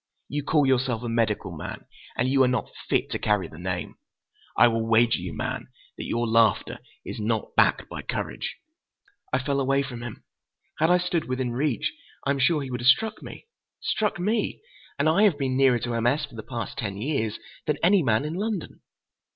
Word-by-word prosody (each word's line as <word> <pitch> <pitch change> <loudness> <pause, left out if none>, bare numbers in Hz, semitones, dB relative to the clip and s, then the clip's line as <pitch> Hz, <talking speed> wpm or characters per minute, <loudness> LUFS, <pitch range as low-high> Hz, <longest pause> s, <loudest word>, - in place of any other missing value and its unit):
You 145 +1 -1
call 145 0 +3
yourself 125 -3 +1
a - - -3
medical 110 -5 0
man—and 120 +9 -5
you 135 +1 +3
are 130 - +6
not 125 -2 -1 0.2
fit - - +1
to - - -2
carry 105 -3 +1
the 80 - -12
name! 90 0 -4 0.6
I - - +8
will 115 -1 +1
wager 115 0 +3
you, 90 -1 -5
man, - - -4 0.3
that - - -6
your 120 +1 0
laughter 110 -4 +2 0.3
is - - -6
not 110 +1 -1
backed - - +3
by - - -6
courage!" - - -4 0.8
I - - +3
fell 140 +2 -1
away 135 +1 +2
from 125 -3 -7
him. 120 -3 -8 0.6
Had 160 +2 +4
I 180 - +6
stood 180 -2 -1
within 130 -1 -2
reach, 130 -1 0 0.3
I 140 - +2
am 140 - 0
sure 150 +2 +3
he 130 - -6
would 125 -1 -3
have 120 - 0
struck 220 +11 +4
me. - - -10 0.3
Struck 210 -4 -1
me! 210 +4 0 0.4
And 145 - +2
I 160 +6 +4
have 200 -8 +5
been 135 -3 -1
nearer 130 -2 +5
to 120 0 -3
M. 115 0 +1
S. 150 +5 +2
for 145 - -19
the 115 - -6
past 120 +3 -5
ten 100 -5 -3
years 110 -3 -1 0.3
than 150 - +1
any 190 +2 +5
man 115 -1 +2
in 155 - -3
London. 200 0 -3
130 Hz, 200 wpm, -26 LUFS, 115-150 Hz, 0.8 s, I